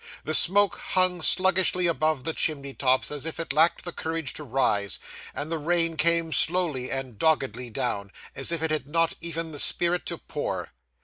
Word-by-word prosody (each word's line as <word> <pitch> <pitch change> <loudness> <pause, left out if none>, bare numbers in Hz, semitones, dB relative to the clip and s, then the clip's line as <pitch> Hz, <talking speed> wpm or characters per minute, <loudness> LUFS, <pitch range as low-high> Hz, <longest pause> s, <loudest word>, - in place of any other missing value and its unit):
The 155 - -3
smoke 200 +5 +7
hung 185 -2 0
sluggishly 185 +1 +2
above 155 -4 0
the 160 - -2
chimney 140 -4 -1
tops 130 0 +1
as 145 -2 -5
if 165 +1 -5
it 165 -4 -3
lacked 160 +5 +2
the 175 - -4
courage 160 -4 -3
to 150 - -8
rise, 110 -7 -1 0.3
and 150 +3 -6
the 165 - -2
rain 165 +1 0
came 165 0 0
slowly 160 -7 +3
and 130 -5 -6
doggedly 135 -6 -1
down, 110 -5 -4 0.2
as 135 +4 -1
if 165 -1 -3
it 160 - -1
had 150 -3 -3
not 165 +2 0
even 165 -1 -4
the 145 - -7
spirit 175 +3 -1
to - - -3
pour. - - -6
160 Hz, 185 wpm, -25 LUFS, 135-170 Hz, 0.3 s, smoke